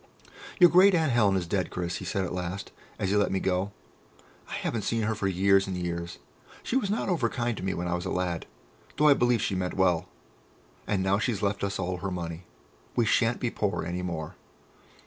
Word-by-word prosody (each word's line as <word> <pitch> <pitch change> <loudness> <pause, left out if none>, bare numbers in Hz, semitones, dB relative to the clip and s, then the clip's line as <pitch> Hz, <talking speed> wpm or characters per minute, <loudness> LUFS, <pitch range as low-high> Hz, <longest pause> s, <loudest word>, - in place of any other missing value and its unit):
"Your 175 -2 +8
great 185 +2 +7
aunt 160 -4 +2
Helen 105 -5 +3
is 90 -2 0
dead, 90 +1 -1
Chris," 90 0 -3
he - - -7
said 95 -1 -1
at 90 - -5
last, 90 +2 -4 0.3
as 95 - -1
he - - +2
let 105 -1 +2
me 95 - +1
go. 95 +2 0 0.8
"I - - -7
haven't 115 - -2
seen 115 +1 -1
her 110 +1 +1
for 105 -2 -2
years 95 +1 +3
and 95 -1 -3
years.... 85 -1 -4 0.5
She - - -2
was 250 -7 +1
not 210 - -1
over 165 -11 +1
kind 120 -1 -1
to - - -6
me 95 0 -1
when 90 +1 -3
I 85 - -1
was 90 +1 -2
a - - -2
lad, 90 -3 -2 0.5
though 150 0 +5
I - - +9
believe 120 -4 +2
she - - 0
meant 90 -1 -2
well.... 90 -1 +2 0.8
And 95 -3 0
now 95 +1 +2
she's 110 -2 -1
left 100 0 0
us 100 -1 -1
all 90 0 -2
her 95 +2 -3
money. 85 -1 -5 0.5
We 120 - +3
shan't 115 +2 +2
be 120 - -1
poor 100 -5 -1
any 90 +1 -3
more." 85 -4 -4
95 Hz, 225 wpm, -28 LUFS, 90-115 Hz, 0.8 s, I